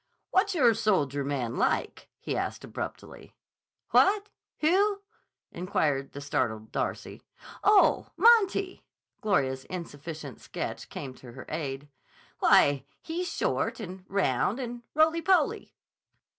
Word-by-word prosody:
"What's 385 +1 +2
your 245 -8 +5
soldier 165 - +1
man 130 -4 -2
like?" - - -1
he - - -4
asked - - -3
abruptly. - - -8 0.6
"What? 410 +1 +4 0.3
Who?" 400 +5 +2 0.5
inquired 150 -6 -1
the 140 - -7
startled 110 -6 -2
Darcy. - - -3 0.4
"Oh, 415 -1 +5
Monty!" 395 -5 +4 0.4
Gloria's 135 -11 0
insufficient 155 -5 -7
sketch - - -5
came 135 -3 -6
to 125 -2 -13
her 130 - -10
aid. 145 -2 -4 0.5
"Why, 140 -2 +5 0.2
he's 350 +2 -3
short - - -1
and 185 -3 -7
round 195 - +1
and 240 -1 -5
roly 320 +2 +4
poly." 375 +1 +1
185 Hz, 115 wpm, -28 LUFS, -, 0.6 s, your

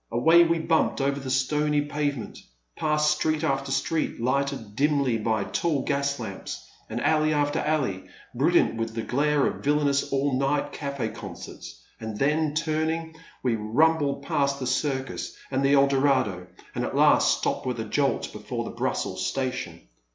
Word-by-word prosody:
Away 160 +9 +6
we 170 0 +2
bumped 160 -1 +1
over 140 0 0
the 135 -1 -6
stony 150 +3 +1
pavement, 145 -4 -3 0.4
past 150 0 +2
street 155 0 0
after 135 -2 -1
street 145 +4 -1
lighted 130 -3 -1
dimly 140 -4 +2
by 110 -1 0
tall 150 +3 -1
gas 140 0 -1
lamps, 100 -5 -7 0.2
and - - -3
alley 155 0 +2
after 145 0 +1
alley 135 -12 -1 0.3
brilliant - - +2
with 115 0 -3
the 115 - -2
glare 145 +2 +1
of - - -3
villainous 145 -1 +1
all 135 -1 +1
night 140 +1 0
caf6 140 -6 -4
concerts, - - -9 0.2
and 110 -1 -5
then, 150 +3 +1
turning, 160 +1 -1 0.3
we 125 -3 +2
rumbled 140 +6 +1
past 140 0 0
the 130 - -3
Circus 130 +1 -2
and 135 0 0
the 140 +1 +4
Eldorado, 135 -9 +2 0.3
and - - -2
at - - -3
last - - +5
stopped - - -2
with 125 -2 -2
a 110 - -3
jolt 140 +5 0
before - - -4
the - - -6
Brussels 95 0 -2
Station. 130 +4 -3
140 Hz, 160 wpm, -26 LUFS, 125-150 Hz, 0.4 s, Away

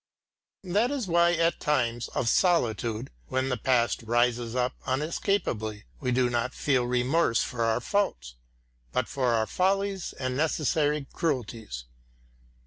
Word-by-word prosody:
That 205 +6 +1
is 275 -5 -2
why 170 -1 +4
at 165 -1 +1
times 120 -5 0
of 120 - 0
solitude, 120 - +1 0.2
when 130 +1 -1
the 125 - +1
past 125 -2 +1
rises 120 0 +1
up 125 0 +1
unescapably, 130 - -1 0.2
we 125 -3 -1
do 125 0 +3
not 120 +1 -1
feel 130 -4 +1
remorse 125 +1 +2
for 115 -2 -2
our 115 +1 +2
faults, 65 - -1 0.6
but - - 0
for 125 -4 +1
our 110 -1 +2
follies 195 - 0
and 130 -1 -3
necessary 150 0 +1
cruelties. 115 - -3
130 Hz, 135 wpm, -27 LUFS, 120-165 Hz, 0.6 s, why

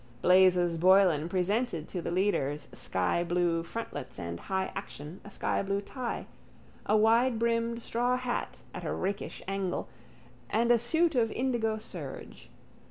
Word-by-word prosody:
_ - - -25
Blazes 180 -2 +5
Boylan 180 -3 +5
presented 185 -1 0
to 180 - -3
the - - -3
leaders' 170 -6 0
skyblue 170 - 0
frontlets 230 +7 -6
and 85 -2 -5
high 190 - -2
action 165 -3 -7
a 205 - -10
skyblue 200 0 -1
tie, 250 0 -4 0.6
a 215 - +4
widebrimmed 230 +1 +2
straw 245 +2 +1
hat 250 -1 -3
at - - -6
a - - -2
rakish 200 +2 -3
angle 195 -2 -2 0.6
and 235 +2 +2
a 240 - +5
suit 320 +8 +2
of 230 -4 +2
indigo 235 -4 0
serge. 215 - -8
195 Hz, 135 wpm, -30 LUFS, 175-235 Hz, 0.6 s, Blazes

